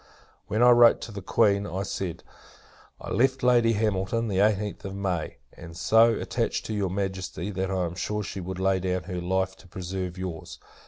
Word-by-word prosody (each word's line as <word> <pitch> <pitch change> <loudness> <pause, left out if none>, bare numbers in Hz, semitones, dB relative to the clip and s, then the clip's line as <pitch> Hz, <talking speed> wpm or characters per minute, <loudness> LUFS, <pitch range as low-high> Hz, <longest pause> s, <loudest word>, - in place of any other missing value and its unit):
When 110 +3 +1
I 125 - +8
wrote 120 -1 +7
to - - -7
the 100 -1 -7
Queen, 100 0 +2
I 95 +3 -3
said 95 -2 -4 0.8
"I - - -8
left 130 +5 +1
Lady 120 -2 +4
Hamilton, 110 +1 0
the 95 -2 0
eighteenth 105 0 +1
of 95 0 -6
May; 95 -5 -3 0.2
and 85 -1 -11
so 115 +4 +5
attached - - -2
to 110 - -4
your 100 -3 -1
Majesty, 95 -1 -3
that 95 0 -2
I 95 -2 0
am 85 - -4
sure 105 +4 -3
she 100 - -6
would 95 +1 -5
lay 95 0 +1
down 90 -1 -2
her 90 0 -5
life 95 +1 -1
to - - -17
preserve 90 0 -5
your's. 90 -4 -6
95 Hz, 195 wpm, -26 LUFS, 90-105 Hz, 0.8 s, I